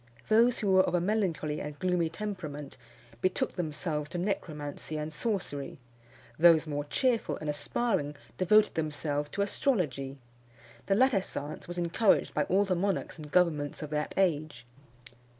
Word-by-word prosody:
Those 230 +2 +5
who 205 -4 0
were 185 0 +7
of 185 - 0
a - - +3
melancholy 175 -6 0
and 150 0 -6
gloomy 180 -2 +1
temperament 160 -7 -6 0.5
betook 185 - 0
themselves 150 -3 -3
to 175 - -4
necromancy 155 -5 -3
and 155 +1 -4
sorcery; 170 -4 -3 0.6
those 165 -1 +7
more 145 -1 -3
cheerful 245 - 0
and 155 - -6
aspiring 150 0 -1 0.2
devoted 210 +4 +4
themselves 150 -2 -2
to 200 - 0
astrology. 150 - -1 0.7
The 195 - +3
latter 250 -3 +4
science 150 -5 -6
was 175 0 -6
encouraged 175 +5 +2
by 150 - +1
all 195 +3 +3
the 190 - +1
monarchs 190 +1 -1
and 150 -1 -8
governments 155 -5 +1
of 150 - -7
that 150 0 -2
age. 155 -9 0
170 Hz, 150 wpm, -30 LUFS, 150-195 Hz, 0.7 s, were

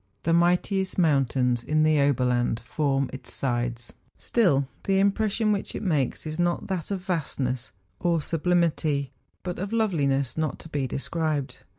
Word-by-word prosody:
The 165 - +2
mightiest 180 +3 +2
mountains 130 -7 +2
in 155 +3 +2
the 155 -2 +4
Oberland 125 -4 +2
form 140 -3 0
its 130 - -7
sides; 120 -2 -2 0.2
still 150 - +2 0.2
the 195 -1 +2
impression 210 +2 +2
which 200 -1 -2
it - - -4
makes 150 - 0
is 155 +2 -5
not 175 0 +1
that 185 -5 -3
of 195 -2 -2
vastness 130 - -2 0.3
or 170 -2 +2
sublimity, 155 -4 0 0.3
but 180 -2 -4
of 195 +3 -3
loveliness 145 - +1
not 155 -1 -1
to 160 - -12
be 140 -4 -1
described. 150 0 -2
155 Hz, 150 wpm, -26 LUFS, 135-180 Hz, 0.3 s, the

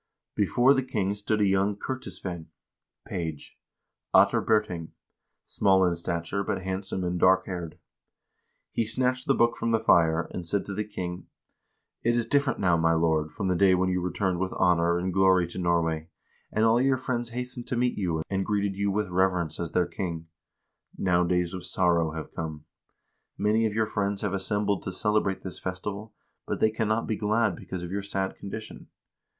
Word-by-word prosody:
Before 120 +6 +4
the 135 - +1
king 105 -7 -1
stood 105 +1 -1
a - - +4
young 95 +1 +2
kertisveinn 95 -8 -5 0.6
(page), 80 -4 -5 0.6
Ottar - - +5
Birting, 100 -7 0 0.5
small 95 -1 +3
in 90 - +2
stature, 85 +3 -2
but 95 - -3
handsome 95 0 -3
and 90 0 -1
dark 95 +1 +4
haired. 85 -4 -6 0.9
He - - 0
snatched 125 +3 0
the 135 - +4
book 120 0 +2
from 115 - -1
the 115 -1 +3
fire, 85 -6 +4
and 90 - -5
said 100 +3 0
to 100 - -5
the 105 +2 -1
king: 90 -3 -5 0.4
" - - -51
It 120 +1 +2
is 120 -1 +1
different 140 -2 +1
now, 90 -4 +3
my 80 0 +3
lord, 80 -1 +1
from 100 -4 -3
the 90 - +2
day 95 0 +5
when 95 +1 +1
you 90 -1 0
returned 90 0 -1
with 95 0 -2
honor 85 -2 +3
and 90 +1 -2
glory 95 -1 +4
to 90 - -6
Norway, 85 -2 0 0.4
and 110 +1 +2
all 115 +2 +4
your 135 0 +3
friends 120 -2 -2
hastened 125 0 -5
to 125 - -1
meet 125 0 +1
you, 85 -5 -1
and 95 -1 -1
greeted 100 -1 -1
you 100 +1 0
with 105 0 -1
reverence 90 -3 +1
as 85 -2 -4
their 90 - +3
king. 85 -4 -5 0.7
Now 90 -2 +2
days 90 0 0
of 90 - -6
sorrow 85 -4 +1
have 80 -1 -7
come. 80 -2 -5 0.7
Many 110 +2 +2
of 105 - -5
your 110 0 +2
friends 100 -1 -2
have 100 -2 -1
assembled 100 +1 0
to 95 - -4
celebrate 105 0 0
this 95 - -5
festival, 100 +4 -5 0.3
but - - -2
they 110 - +3
can 110 0 -1
not 110 +2 +1
be 110 - -1
glad 105 -2 +1
because 90 0 -7
of 90 - -6
your 100 +1 -2
sad 95 -1 -2
condition. 110 +2 -8
95 Hz, 190 wpm, -27 LUFS, 90-110 Hz, 0.9 s, Ottar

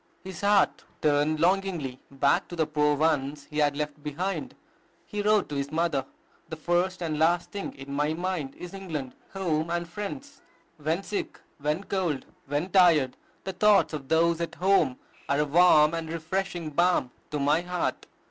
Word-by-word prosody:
His 190 -3 -8
heart 200 -1 +3 0.2
turned 150 +1 +2
longingly 175 -7 0
back 140 0 +2
to 175 - -7
the 160 -2 +1
poor 150 -1 +2
ones 145 -2 0
he 150 - -2
had 145 -1 +2
left 150 0 -4
behind. 170 +7 -3 0.5
He 210 -1 -3
wrote 210 0 +3
to 145 - -4
his 140 +1 -2
mother, 155 -5 0 0.4
"The 160 - -4
first 175 +3 0
and 155 -2 -2
last 170 +2 +2
thing 200 -1 -5
in 135 +1 -8
my 150 +2 0
mind 175 -6 -3
is 180 +1 -9
England, 160 -10 -5 0.2
home, 165 -4 -1
and 170 0 -2
friends. 265 - -7 0.4
When 160 +5 -1
sick, 205 - -4 0.2
when 150 +6 -1
cold, 175 -10 -1 0.2
when 145 +6 -2
tired, 165 -9 +5 0.3
the 190 - -4
thoughts 205 -1 +4
of 140 -3 -5
those 165 +1 +3
at 170 - -3
home 185 -9 +3 0.3
are 140 - +2
a 150 - +2
warm 155 0 +5
and 165 -1 -3
refreshing 165 0 -3
balm 170 -5 +2 0.2
to 150 - -2
my 145 +4 +3
heart.... 180 0 -3
160 Hz, 170 wpm, -27 LUFS, 150-185 Hz, 0.5 s, tired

